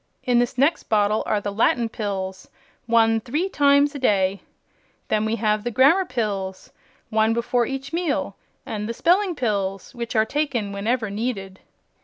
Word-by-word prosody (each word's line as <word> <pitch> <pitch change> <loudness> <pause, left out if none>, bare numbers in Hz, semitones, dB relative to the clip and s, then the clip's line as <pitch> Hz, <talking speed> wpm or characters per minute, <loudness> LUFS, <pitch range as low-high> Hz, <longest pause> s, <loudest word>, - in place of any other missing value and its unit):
In 245 -1 +3
this 240 +1 -1
next 280 +6 +1
bottle 210 0 +2
are 210 - +1
the 205 0 -4
Latin 230 +2 +2
Pills 190 -4 -5 0.4
one 225 -1 +4
three 300 - -2
times 285 -2 +3
a 285 - -6
day. 195 -5 +1 0.7
Then 215 0 +1
we 220 +1 0
have 215 -2 0
the 240 - -1
Grammar 280 - +4
Pills 200 - -4 0.4
one 220 +1 +2
before 235 0 0
each 270 +2 -5
meal 335 -3 -1 0.3
and 210 0 -4
the 230 - -3
Spelling 365 - +2
Pills, 200 -6 -2
which 235 -2 -5
are 220 0 +4
taken 255 -6 -2
whenever 215 +2 -1
needed." 200 -3 -4
225 Hz, 160 wpm, -23 LUFS, 205-260 Hz, 0.7 s, one